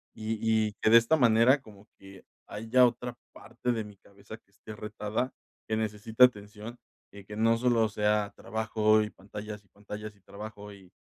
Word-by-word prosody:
y 110 0 -3 0.3
y 105 - -13
que - - +3
de 115 - +10
esta 120 +7 +3
manera, 120 +2 +5
como 105 -3 -16
que 95 -1 -15 0.2
haya 115 +4 +3
otra 120 +1 -5 0.2
parte 125 - -4
de 115 -2 -2
mi 105 -2 -13
cabeza 100 +3 -13
que 100 - -36
esté 110 +2 -11
retada, 105 +4 -3 0.4
que 110 - -1
necesita 110 +2 +1
atención 105 0 -5 0.4
y 100 -1 -12
que 105 +1 -9
no 115 +1 +3
solo 115 -2 +2
sea 105 -1 0
trabajo 110 -1 +1
y 105 - -5
pantallas 105 +1 -9
y - - -30
pantallas 105 +1 -9
y 100 - -28
trabajo 105 +1 -10
y 95 -2 -17
110 Hz, 180 wpm, -29 LUFS, 105-115 Hz, 0.4 s, de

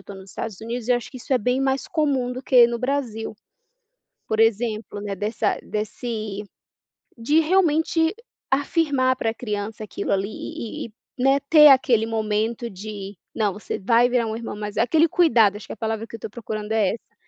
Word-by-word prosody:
estou, 195 0 -10
nos 190 0 -12
Estados 215 +1 -6
Unidos 235 +1 -5
e - - +1
eu 245 - +5
acho 240 - -7
que 265 - -10
isso 255 +2 -5
é 255 - +4
bem 250 +4 0
mais 270 0 0
comum 275 -6 0
do 255 - -6
que 250 -2 +6
no 235 0 -2
Brasil. 245 -5 -2 0.9
Por 220 0 0
exemplo, 225 -1 0
né, 205 -1 -3
dessa 210 +2 -1
desse 215 -1 -4 0.8
de 290 +8 +3
realmente 325 -1 +2 0.4
afirmar 275 -2 +2
para 225 - 0
a 225 - -7
criança 215 -1 -4
aquilo 200 - -4
ali 195 +1 0
e 225 +1 -6
e 225 - -16 0.3
e, - - -2
né, 270 +1 +4
ter 305 -2 +9
aquele 255 -5 +5
momento 220 +1 -1
de 200 0 -8 0.2
"não 210 -3 +1
você 205 +3 -5
vai 235 +4 +4
virar 245 -2 +1
irmão 230 -2 -6
mais 210 0 -6
velho" - - +3
aquele 320 +3 +4
cuidado 230 - +4
acho 210 - -10
que - - -7
a - - -21
palavra 220 +1 -3
que - - -15
eu - - -17
estou - - -7
procurando 215 -1 -5
é 210 -4 +2
essa. 230 - -8
230 Hz, 200 wpm, -23 LUFS, 210-260 Hz, 0.9 s, ter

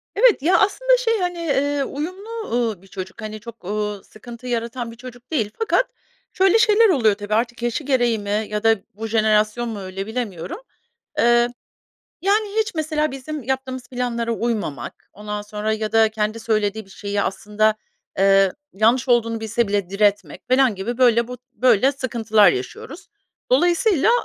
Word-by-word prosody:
Evet. 450 - +4
Ya, 355 +7 +4
aslında, - - +3
şey, 455 -3 0
hani, 355 -1 -2
eee, 285 -3 0
uyumlu, 365 +10 -6 0.2
ııı, 225 -6 0
bir 195 - -18
çocuk, 190 +2 -8
hani, 215 0 -6
çok, 230 -3 -12
ııı, 210 0 -3
sıkıntı 235 +3 -11
yaratan 235 0 -3
bir - - -12
çocuk 245 +2 -12
değil, 220 -9 0
fakat 460 +2 +2 0.5
şöyle 385 +4 +4
şeyler 440 +1 +5
oluyor, 230 - +3
tabii, 205 +1 -5
artık 235 +2 0
yaşı 240 +5 -1
gereği 245 -5 +1
mi 205 +1 -1
ya 210 +1 -3
da 225 0 +5 0.2
bu 220 +3 -5
jenerasyon 215 +1 +2
mu 220 -2 -5
öyle, 190 +1 -6
bilemiyorum. 220 -8 -4 0.6
Eee, 240 -2 +4 0.7
yani, 410 +2 +2
hiç, 440 -4 -2
mesela, 310 -1 0
bizim 270 +2 -6
yaptığımız 260 0 -4
planlara 240 -2 -2
uymamak, 215 - -4
ondan 210 0 -5
sonra 210 +1 -3
ya 215 0 -3
da 225 0 +5
kendi 215 +1 -2
söylediği 215 -1 -1
bir 195 - -21
şeyi 200 +1 -3
aslında, 210 +3 0 0.4
eee, 195 -1 +5 0.2
yanlış 235 +6 +2
olduğunu 230 -2 +2
bilse 220 0 -1
bile 200 -3 -1
diretmek 205 +1 0
falan 255 -3 +4
gibi, 230 +6 -4
böyle, 235 -2 +4
bu, 250 -1 -7
böyle, 255 +1 +3
sıkıntılar 225 -6 +3
yaşıyoruz. 130 - -7 0.4
Dolayısıyla, 360 - +3
230 Hz, 160 wpm, -21 LUFS, 210-270 Hz, 0.7 s, şeyler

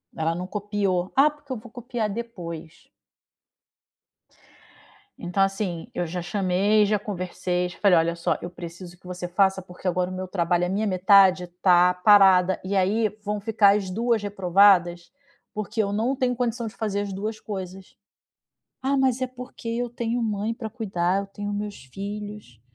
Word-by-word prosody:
Ela 160 +1 -1
não 180 +1 -4
copiou, 200 -2 -1
"ah, 280 +3 +6
porque 290 -2 -15
eu 255 - -2
vou 220 +1 -13
copiar 240 -2 -3
depois." 175 -8 -7 2.3
Então 180 +3 0
assim, 195 -2 -2
eu 175 - -2
já 180 +2 -4
chamei, 195 +3 +2
já 210 +1 +2
conversei, 180 -2 -3
já 175 - -12
falei: 195 -4 +5
"Olha 165 +1 +1
só 170 - -1
eu 175 - -5
preciso 175 0 -10
que - - -25
você 180 0 -5
faça, 190 +1 +2
porque 180 0 -9
agora 180 0 0
o - - -6
meu 185 0 -5
trabalho, 175 -1 +1
a - - -3
minha 205 +3 0
metade 185 -1 +5
tá 180 -1 +5
parada, 190 -1 +5
e 190 +2 -2
aí 210 +4 +2
vão 210 0 -2
ficar 205 -1 +4
as 200 -3 -2
2 230 +3 0
reprovadas 185 -3 +3 0.4
porque 215 +1 -2
eu 200 - -2
não 225 +6 0
tenho 255 -1 0
condição 240 -1 -2
de 215 - -9
fazer 205 -2 -2
as 200 -1 -4
2 215 +3 -4
coisas." 190 -2 -7 0.9
"Ah, 275 +1 +1
mas 260 -2 +2
é 255 - 0
porque 250 -2 -10
eu 240 +1 -2
tenho 235 0 -2
mãe 215 0 -1
pra 225 -2 -6
cuidar, 195 -5 -1
eu - - -8
tenho 205 +1 -6
meus 205 -5 -5
filhos" 205 - -7
200 Hz, 170 wpm, -24 LUFS, 180-220 Hz, 2.3 s, ah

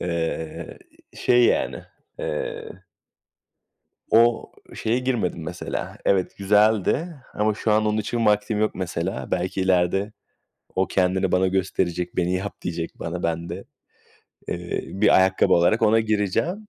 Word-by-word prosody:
Eee, 80 -2 -4 0.4
şey 120 0 +3
yani, - - +1 0.4
eee 75 - -5 1.3
o 115 +1 +4 0.2
şeye 115 +3 0
girmedim 120 -10 -1
mesela. 80 - -5
Evet, 95 -2 +1
güzeldi 105 - +2 0.2
ama 105 0 +1
şu 110 +1 -1
an 110 0 +3
onun 105 0 +1
için 115 +2 -1
vaktim 105 0 +2
yok 110 - 0
mesela. 85 -6 -3
Belki 95 - -1
ileride 95 +2 +1 0.6
o 95 0 +1
kendini 95 0 +1
bana 95 +1 +3
gösterecek, 90 -2 -1
beni 90 0 +1
yap 95 +2 -5
diyecek 85 -2 -5
bana. 85 +2 -4
Ben 85 0 -2
de, 90 +3 -6 0.9
eee, 85 0 -3
bir 100 +2 +3
ayakkabı 95 0 +4
alarak 90 +7 +3
ona 110 +1 +5
gireceğim. 110 - -1
95 Hz, 130 wpm, -23 LUFS, 90-110 Hz, 1.3 s, ona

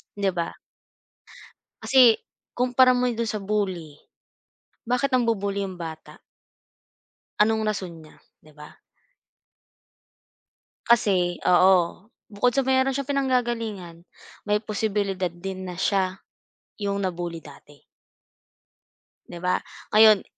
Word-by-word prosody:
Di 200 -1 0
ba? 170 -1 -2 1.3
Kasi 250 -4 +5 0.3
kumpara 255 +1 +4
mo 250 0 +1
dun 230 -1 -2
sa 215 - -2
bully, 190 -7 -3 0.9
bakit 250 +3 0
nangbu-bully 200 -5 0
yung 190 -2 -7
bata? 160 -2 -9 1.2
Anong 220 +1 +3
rason 175 -5 -7
niya, 155 - -18 0.2
di 155 - -18
ba? 150 0 -14 2.1
Kasi 190 -7 +2
oo 180 +1 +3 0.2
bukod 215 +4 +1
sa 275 - +2
meron 265 +1 +2
siyang 275 +1 -4
pinanggagalingan, 230 -10 -2 0.4
may 210 0 +1
posibilidad 200 -4 -2
din 185 +2 -7
na 180 - -6
siya 190 -1 0 0.6
yung 200 0 -1
na-bully 175 -3 -4
dati. 145 -1 -16 1.5
Di 175 - -9
ba? 180 - +1 0.3
Ngayon 215 -2 +6
200 Hz, 105 wpm, -24 LUFS, 180-235 Hz, 2.1 s, Ngayon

